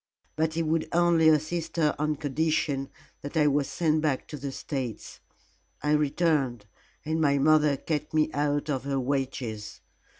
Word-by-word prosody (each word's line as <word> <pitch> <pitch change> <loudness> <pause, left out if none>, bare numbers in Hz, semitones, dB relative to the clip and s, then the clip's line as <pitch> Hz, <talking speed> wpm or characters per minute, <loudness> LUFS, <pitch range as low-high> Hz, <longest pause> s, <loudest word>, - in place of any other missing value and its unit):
But 160 0 0
he 165 - 0
would 160 0 0
only 170 -2 +4
assist 160 +2 0
her 155 -3 +2
on 150 0 0
condition 145 -1 -1 0.3
that 145 +4 -5
I 150 - +4
was 145 -1 +2
sent 155 -2 +1
back 150 -4 -1
to 150 - -6
the 140 0 -5
States. 130 -5 -5 0.6
I 150 - +1
returned, 150 -6 +1 0.4
and 160 +1 -1
my 140 -2 +3
mother 150 0 +4
kept 150 0 -3
me 155 0 +2
out 145 0 0
of 135 -4 -2
her 140 -1 -1
wages. 130 -5 -3
150 Hz, 160 wpm, -27 LUFS, 140-160 Hz, 0.6 s, only